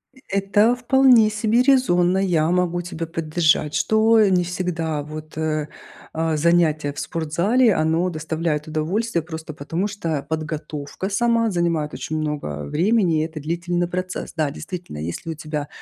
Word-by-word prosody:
Э -, -, -21 dB
это 205 Hz, +4 st, +3 dB
вполне 250 Hz, -3 st, +5 dB
себе 215 Hz, +3 st, +2 dB
резонно, 190 Hz, -10 st, +3 dB
я 170 Hz, -5 st, +2 dB
могу 175 Hz, -1 st, +1 dB
тебя 170 Hz, -1 st, -5 dB
поддержать, 155 Hz, -2 st, +1 dB
что, 220 Hz, +1 st, +3 dB
э, 210 Hz, -2 st, +5 dB
не 180 Hz, -2 st, +3 dB
всегда 170 Hz, -4 st, -2 dB
вот, 155 Hz, +1 st, -9 dB
э, 155 Hz, -1 st, -1 dB, 0.5 s
а, 160 Hz, 0 st, 0 dB
занятия 155 Hz, -2 st, +2 dB
в 145 Hz, -, -7 dB
спортзале, 180 Hz, +9 st, +1 dB
оно 160 Hz, +3 st, +1 dB
доставляет 160 Hz, -1 st, -2 dB
удовольствие 170 Hz, +6 st, -1 dB
просто 160 Hz, -1 st, -8 dB
потому, 165 Hz, +7 st, -3 dB
что 165 Hz, -8 st, -3 dB
подготовка 155 Hz, +2 st, -4 dB
сама 230 Hz, +1 st, +2 dB
занимает 170 Hz, -4 st, 0 dB
очень 155 Hz, -, -4 dB
много 145 Hz, -, -3 dB
времени, 175 Hz, -, +2 dB
и -, -, 0 dB
это 160 Hz, -1 st, -7 dB
длительный 175 Hz, +3 st, -2 dB
процесс. 185 Hz, +1 st, -4 dB
Да, 155 Hz, -3 st, 0 dB
действительно, 170 Hz, -, -7 dB
если 85 Hz, -, -5 dB
у -, -, -3 dB
тебя 150 Hz, -1 st, -4 dB
170 Hz, 150 wpm, -22 LUFS, 155-195 Hz, 0.5 s, вполне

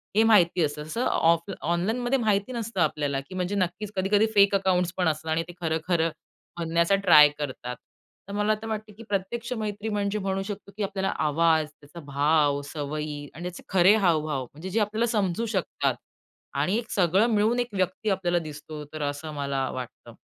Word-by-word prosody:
हे 220 Hz, -, +5 dB
माहिती 185 Hz, -6 st, +4 dB
असतं. 150 Hz, 0 st, -2 dB
तसं 195 Hz, +11 st, -2 dB
ऑफ 165 Hz, +3 st, +2 dB
ऑनलाईनमध्ये 220 Hz, -, 0 dB
माहिती 210 Hz, 0 st, +1 dB
नसतं 225 Hz, -5 st, -3 dB
आपल्याला, 145 Hz, -3 st, 0 dB
की 140 Hz, +7 st, -10 dB
म्हणजे 185 Hz, +2 st, -1 dB
नक्कीच 185 Hz, +2 st, -2 dB
कधी-कधी 200 Hz, +3 st, +3 dB
फेक 200 Hz, 0 st, +6 dB
अकाउंट्सपण 180 Hz, -2 st, +1 dB
असतात 160 Hz, 0 st, -1 dB
आणि 160 Hz, +1 st, +1 dB
ते 175 Hz, -, -9 dB
खरं, 160 Hz, -1 st, 0 dB
खरं 165 Hz, -2 st, +2 dB, 0.5 s
बनण्याचा 170 Hz, +3 st, +2 dB
ट्राय 150 Hz, -7 st, +7 dB
करतात. 130 Hz, -3 st, -4 dB, 0.5 s
तर -, -, -5 dB
मला 210 Hz, +1 st, +2 dB
असं 215 Hz, +1 st, -6 dB
वाटतं, 215 Hz, -1 st, -5 dB
की 230 Hz, -, -10 dB
प्रत्यक्ष 205 Hz, +5 st, -2 dB
मैत्री 210 Hz, 0 st, -3 dB
म्हणजे 205 Hz, 0 st, -1 dB
म्हणू 195 Hz, 0 st, -1 dB
शकतो, 200 Hz, 0 st, -7 dB
की 210 Hz, -, -1 dB
आपल्याला 195 Hz, -1 st, -1 dB, 0.2 s
आवाज, 160 Hz, 0 st, +3 dB
त्याचा 150 Hz, +4 st, -12 dB
भाव, 145 Hz, 0 st, +2 dB
सवयी 150 Hz, 0 st, -4 dB
आणि 170 Hz, -, -8 dB
त्याचे 180 Hz, 0 st, -6 dB
खरे 190 Hz, +2 st, +6 dB
हावभाव 155 Hz, -9 st, +1 dB
म्हणजे 155 Hz, +9 st, -9 dB
जे 220 Hz, -, 0 dB
आपल्याला 215 Hz, +2 st, +1 dB
समजू 205 Hz, -1 st, 0 dB
शकतात -, -, 0 dB, 0.6 s
आणि 195 Hz, +5 st, +1 dB
एक 235 Hz, -, -4 dB
सगळं 190 Hz, +4 st, +3 dB
मिळून 220 Hz, +4 st, +2 dB
एक 245 Hz, 0 st, -1 dB
व्यक्ती 185 Hz, +3 st, -1 dB
आपल्याला 175 Hz, -3 st, +1 dB
दिसतो, 155 Hz, -1 st, -8 dB
तर 155 Hz, -, -5 dB
असं 150 Hz, +2 st, -6 dB
मला 140 Hz, -2 st, -2 dB
वाटतं. 125 Hz, -2 st, -8 dB
180 Hz, 180 wpm, -26 LUFS, 155-205 Hz, 0.6 s, ट्राय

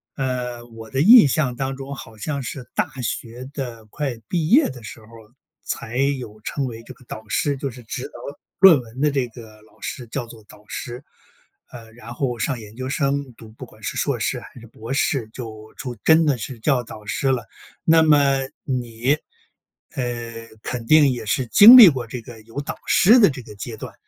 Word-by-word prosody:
呃， 125 Hz, -3 st, -3 dB
我 115 Hz, -1 st, -12 dB
的 135 Hz, -, 0 dB
印 220 Hz, -, +9 dB
象 135 Hz, -3 st, 0 dB
当 135 Hz, +1 st, -3 dB
中 135 Hz, +1 st, -7 dB
好 115 Hz, -4 st, -11 dB
像 140 Hz, +6 st, -3 dB
是 125 Hz, 0 st, -6 dB
大 -, -, 0 dB
学 120 Hz, +3 st, -5 dB
的 120 Hz, -6 st, -6 dB
快 135 Hz, -1 st, -4 dB
毕 165 Hz, -3 st, -1 dB
业 285 Hz, -, +5 dB
的 130 Hz, -2 st, -10 dB
时 110 Hz, -, -9 dB
候 110 Hz, -, -17 dB
儿 115 Hz, 0 st, -16 dB, 0.3 s
才 115 Hz, +2 st, -5 dB
有 130 Hz, -6 st, -2 dB
称 140 Hz, +5 st, -3 dB
为 115 Hz, -3 st, -7 dB
这 -, -, -12 dB
个 125 Hz, -, -21 dB
导 110 Hz, -1 st, -9 dB
师， 145 Hz, -1 st, 0 dB
就 140 Hz, +1 st, -3 dB
是 120 Hz, +1 st, -13 dB
指 125 Hz, +3 st, -6 dB
导 -, -, -23 dB, 0.5 s
论 175 Hz, -8 st, +8 dB
文 120 Hz, +1 st, -12 dB
的 150 Hz, 0 st, +3 dB
这 135 Hz, -3 st, 0 dB
个 110 Hz, -2 st, -14 dB
老 110 Hz, -, -24 dB
师 125 Hz, -3 st, -6 dB
叫 120 Hz, +2 st, -4 dB
做 115 Hz, -2 st, -14 dB
导 105 Hz, 0 st, -18 dB
师。 125 Hz, +2 st, -7 dB, 0.7 s
呃， 115 Hz, -2 st, -12 dB
然 120 Hz, 0 st, -10 dB
后 125 Hz, -3 st, -2 dB
上 125 Hz, +2 st, -2 dB
研 105 Hz, 0 st, -12 dB
究 130 Hz, +1 st, -5 dB
生 140 Hz, -2 st, -1 dB
读 110 Hz, -, -14 dB
不 110 Hz, -, -10 dB
管 -, -, -20 dB
是 -, -, -4 dB
硕 -, -, -1 dB
士 -, -, -1 dB
还 -, -, -13 dB
是 -, -, -12 dB
博 115 Hz, +2 st, -10 dB
士 135 Hz, -4 st, 0 dB
就 110 Hz, -3 st, -9 dB
出 125 Hz, -3 st, -6 dB
真 160 Hz, 0 st, +5 dB
的 145 Hz, -4 st, +2 dB
是 115 Hz, +2 st, -7 dB
叫 125 Hz, 0 st, +1 dB
导 110 Hz, -2 st, -11 dB
师 120 Hz, +7 st, -2 dB
了。 120 Hz, -4 st, -2 dB, 0.4 s
那 160 Hz, 0 st, +5 dB
么 140 Hz, -3 st, +4 dB, 0.2 s
你， 125 Hz, +1 st, -1 dB, 0.8 s
呃， 120 Hz, -3 st, -5 dB, 0.2 s
肯 120 Hz, -2 st, -5 dB
定 150 Hz, +2 st, +6 dB
也 120 Hz, -3 st, -5 dB
是 125 Hz, +5 st, -1 dB
经 215 Hz, -, +10 dB
历 220 Hz, -7 st, +11 dB
过 130 Hz, -5 st, -3 dB
这 120 Hz, +2 st, -6 dB
个 115 Hz, 0 st, -12 dB
有 115 Hz, +6 st, -6 dB
导 145 Hz, -, -6 dB
师 225 Hz, +7 st, +6 dB
的 205 Hz, -, +6 dB
这 130 Hz, -3 st, -6 dB
个 105 Hz, -, -13 dB
阶 110 Hz, +3 st, -7 dB
段， -, -, -8 dB
125 Hz, 225 characters per minute, -22 LUFS, 115-140 Hz, 0.8 s, 历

